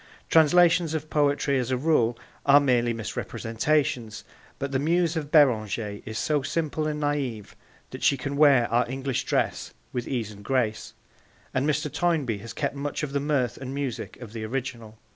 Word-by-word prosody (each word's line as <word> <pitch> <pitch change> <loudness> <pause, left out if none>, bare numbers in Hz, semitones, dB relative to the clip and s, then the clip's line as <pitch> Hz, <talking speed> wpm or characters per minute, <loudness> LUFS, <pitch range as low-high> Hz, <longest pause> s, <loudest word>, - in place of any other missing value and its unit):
Translations 165 0 +5
of 155 0 -5
poetry 145 -2 +2
as 125 -1 -2
a 130 - +1
rule 125 -5 +2 0.3
are 145 +1 +7
merely 125 -4 +2
misrepresentations, 115 +1 -2 0.3
but 140 0 -4
the 135 - 0
muse 170 +3 +1
of 150 -3 -3
Beranger 110 -7 +2
is 110 0 -5
so 150 -2 +1
simple 155 +2 -2
and 150 0 -2
naive 140 -8 -2 0.4
that - - -8
she 140 - +3
can 140 +2 -4
wear 140 -5 +5
our 120 +1 +2
English 135 -1 -2
dress - - -1 0.2
with 125 -1 -3
ease 115 -5 -2
and 100 -1 -12
grace, 120 -3 -1 0.6
and 135 +3 +1
Mr. 150 0 -1
Toynbee 150 -11 0
has 115 +3 -8
kept 140 -2 -2
much 145 +2 -4
of 140 -2 -4
the 140 - +1
mirth 140 -4 0
and 130 0 -6
music 140 -4 -4
of 115 -4 -10
the 110 -2 -5
original. 115 -2 -5
135 Hz, 175 wpm, -26 LUFS, 120-150 Hz, 0.6 s, are